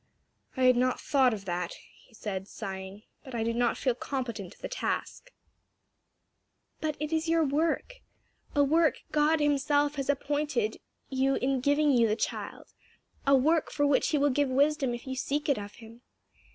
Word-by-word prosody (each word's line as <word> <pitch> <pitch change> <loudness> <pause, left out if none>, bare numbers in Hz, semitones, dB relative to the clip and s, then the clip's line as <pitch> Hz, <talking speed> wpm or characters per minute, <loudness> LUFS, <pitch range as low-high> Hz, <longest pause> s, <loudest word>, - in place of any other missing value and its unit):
"I 260 - +1
had 255 -1 +6
not 255 +1 +1
thought 265 -3 +3
of 205 -3 -5
that," 175 -1 -3 0.3
he 235 - -21
said 195 -3 -5
sighing, 190 +1 -7 0.2
"but 260 -4 -8
I 225 - 0
do 230 +1 0
not 240 0 +1
feel 255 - +1
competent 235 -7 -5
to - - -24
the - - -5
task." - - -4 1.5
"But 310 -1 -2
it 300 +1 -3
is 320 +1 0
your 330 0 +3
work; 320 - 0 0.6
a 285 - +5
work 320 +3 +2
God 305 +1 +3
himself 290 0 +2
has 275 0 -3
appointed 285 -5 0 0.3
you 270 0 +1
in 265 0 0
giving 285 +3 +3
you 235 -3 +4
the 215 - +1
child; - - -5 0.5
a 275 - +7
work 310 +5 +2
for 290 - +1
which 285 -2 +3
he 305 - +1
will 285 0 +3
give 285 +1 +1
wisdom 275 -1 +2
if 240 - -10
you 260 -1 -4
seek 290 +3 -2
it 280 -6 +2
of 205 0 -8
him. 230 0 -14
270 Hz, 180 wpm, -29 LUFS, 235-295 Hz, 1.5 s, a